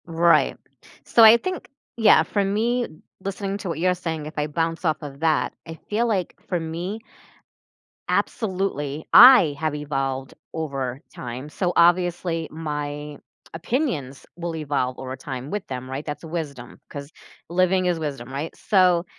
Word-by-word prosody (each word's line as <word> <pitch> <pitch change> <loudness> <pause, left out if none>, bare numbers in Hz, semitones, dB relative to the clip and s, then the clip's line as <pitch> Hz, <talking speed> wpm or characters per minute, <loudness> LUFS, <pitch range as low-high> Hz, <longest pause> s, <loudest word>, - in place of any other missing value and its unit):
Right. 170 0 +3 0.5
So 230 - +5
I 220 +1 +10
think 370 +7 -5 0.3
yeah, 220 -2 +6
for 205 - 0
me, 230 +5 0 0.4
listening 195 0 -3
to 195 - -5
what 165 - -3
you're 180 +2 +3
saying, 165 -4 -4
if 155 - -7
I 150 0 0
bounce 165 +2 -2
off 155 -2 +2
of 140 -2 -8
that, 160 -1 +1
I 160 0 -8
feel, 225 +3 +1
like, 195 -6 -1
for 180 - -1
me, 170 +7 -5 1.1
absolutely, 180 - -1
I 245 - +9
have 155 -2 -1
evolved 135 -2 -3 0.2
over 135 -5 -3
time, 125 +3 -7
so, 180 +3 -1
obviously, 175 -1 +2
my 150 -2 -5 0.4
opinions 165 - -2
will 170 -1 -4
evolve 140 -4 -1
over 130 0 -5
time 135 -1 -7
with 210 -2 -3
them, 130 -1 -6
right? 135 +3 -5
That's 150 +2 -6
wisdom, 155 -7 -6
'cause 140 +1 -8 0.4
living 185 +1 +2
is 175 -2 +1
wisdom, 135 -5 -5
right? 145 +4 -4
So, 180 -4 +3
165 Hz, 150 wpm, -23 LUFS, 145-185 Hz, 1.1 s, I